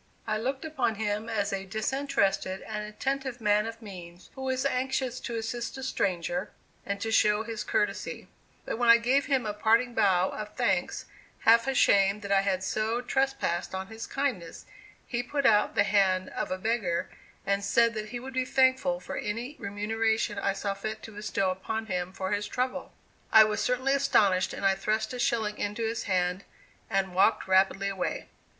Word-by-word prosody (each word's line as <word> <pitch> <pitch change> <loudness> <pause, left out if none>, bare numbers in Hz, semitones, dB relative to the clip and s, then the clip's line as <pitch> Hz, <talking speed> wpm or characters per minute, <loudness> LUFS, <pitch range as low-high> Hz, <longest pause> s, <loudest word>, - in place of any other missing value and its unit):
I 215 0 -1
looked 265 +6 -3
upon 290 -8 -1
him 210 +1 -2
as 205 -3 -1
a 195 -1 -2
disinterested 215 -4 -1
and 210 -1 -4
attentive 265 +4 -3
man 210 0 +2
of 225 0 -8
means 180 -3 -11
who 265 - -9
was 260 0 -1
anxious 260 -1 -1
to 235 - -5
assist 230 +3 -4
a 265 - -6
stranger 180 -6 -1 0.4
and 200 0 -2
to 225 - -2
show 210 0 +3
his 225 -2 -5
courtesy; 210 -1 -2 0.4
but - - -4
when 240 -1 +3
I 230 - +10
gave 255 +4 +1
him 265 -4 +1
a 210 - -2
parting 230 +4 +2
bow 190 -4 +3
of 210 0 -7
thanks, - - 0 0.4
half 230 +2 +5
ashamed 200 -6 +3
that 200 - -5
I 195 -1 +5
had 190 -1 -1
so 215 +4 -1
trespassed 265 -9 -1
on 190 0 -5
his 225 0 -7
kindness, 250 -12 -3 0.4
he 240 -1 -2
put 280 +3 -2
out 210 -4 +4
the 200 - +5
hand 190 -2 +2
of - - -3
a 185 - -2
beggar 200 -5 -1 0.3
and 200 0 0
said 230 +2 +3
that 215 -1 -5
he 240 - -5
would 265 +2 -8
be 255 0 +1
thankful 260 -9 +2
for - - -6
any 235 +7 -4
remuneration 215 +1 -1
I 200 0 0
saw 200 0 -2
fit 215 +2 -6
to 225 - -9
bestow 200 -2 -1
upon 220 +4 -4
him 180 -3 -3
for 190 0 -4
his 205 0 -1
trouble. 255 +1 -3 0.4
I 220 -1 +9
was 215 0 -1
certainly 255 +2 +1
astonished, 205 -9 +3
and - - -4
I 195 - +5
thrust 215 +5 -1
a 250 - -5
shilling 220 -3 0
into 210 +3 -2
his 225 +1 -2
hand 180 -1 0 0.5
and 190 -1 0
walked 190 +2 +3
rapidly 190 +1 +3
away. 195 -2 -3
215 Hz, 185 wpm, -28 LUFS, 195-240 Hz, 0.5 s, I